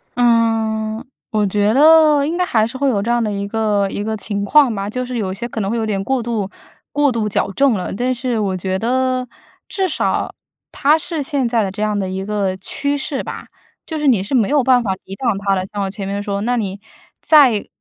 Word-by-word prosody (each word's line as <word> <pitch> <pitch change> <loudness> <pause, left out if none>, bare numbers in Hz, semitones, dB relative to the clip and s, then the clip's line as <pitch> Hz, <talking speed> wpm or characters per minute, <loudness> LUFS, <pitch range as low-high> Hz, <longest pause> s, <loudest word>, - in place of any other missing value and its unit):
嗯， 225 -1 +1 0.2
我 215 -1 +1
觉 205 +2 +1
得 305 0 +6
应 325 +4 -2
该 360 - +1
还 220 -10 +2
是 260 +3 -7
会 280 0 +1
有 210 -6 0
这 220 - -3
样 240 -1 +2
的 215 - -1
一 200 0 -3
个 210 -2 0
一 205 - -4
个 220 +1 -2
情 200 -1 -3
况 280 +1 +5
吧， 200 -1 -3
就 250 +3 -3
是 250 0 -4
有 190 -4 -2
些 235 +5 -5
可 230 -2 -4
能 195 - -2
会 235 - -1
有 225 - -1
点 205 -3 -1
过 265 +3 0
度 225 -4 -2 0.4
过 290 -1 +2
度 225 -3 -1
矫 200 - -1
正 275 +4 +3
了。 185 -4 -3
但 250 +5 0
是 245 -2 -2
我 195 -3 -1
觉 185 +1 -2
得 255 +3 0 0.4
至 385 -1 -1
少 325 - -1 0.4
它 300 +2 +3
是 320 0 -3
现 275 -3 -1
在 230 -2 +1
的 195 - -3
这 210 +2 -6
样 210 -1 0
的 190 -2 -2
一 190 +1 -4
个 200 -2 -1
趋 285 +9 -2
势 275 0 -3
吧。 - - -7 0.4
就 320 -2 -4
是 300 - 0
你 235 -8 +4
是 200 - -5
没 225 -5 +3
有 290 -2 +2
办 250 -1 +4
法 195 -4 0
抵 195 - -8
挡 230 -2 -1
它 200 -1 0
的， 185 0 -2
像 205 - -2
我 195 - -2
前 195 0 -6
面 200 +1 -3
说， 200 -1 -2
那 245 +4 0
你 200 -4 -3 0.4
再 270 -9 +4
225 Hz, 255 characters per minute, -18 LUFS, 200-260 Hz, 0.4 s, 得